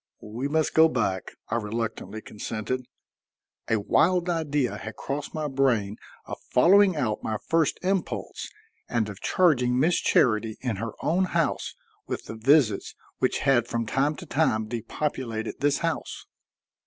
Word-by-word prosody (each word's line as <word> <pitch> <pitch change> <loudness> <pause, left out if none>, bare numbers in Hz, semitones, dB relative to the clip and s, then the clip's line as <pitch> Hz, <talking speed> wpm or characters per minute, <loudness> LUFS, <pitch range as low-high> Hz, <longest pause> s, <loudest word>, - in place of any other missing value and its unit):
"We 125 +5 -2
must 155 +1 +1
go 160 0 +6
back," 95 -9 -1 0.2
I 115 - 0
reluctantly 110 0 -4
consented. 115 +4 -4 0.8
A 115 - +2
wild 175 - +2
idea 150 -6 0
had 110 - -7
crossed 145 +3 -5
my 155 -1 -1
brain 120 -7 +1 0.3
of - - -7
following 190 +7 +5
out 120 -8 -1
my 110 - -2
first 165 +6 +1
impulse 190 0 -2 0.4
and 115 -3 0
of 100 - -9
charging 125 -9 +3
Miss 165 +5 +3
Charity 110 -2 +2
in 120 -6 -2
her 115 +2 -4
own 180 +4 +2
house 165 -3 -1 0.3
with - - -4
the - - -7
visits 115 -2 +2 0.2
which - - +1
had 120 -4 +3
from 115 -1 -2
time 140 +6 +1
to - - -9
time 110 -8 +1
depopulated 115 0 -4
this 145 0 +2
house. 165 - -3
130 Hz, 145 wpm, -26 LUFS, 110-155 Hz, 0.8 s, go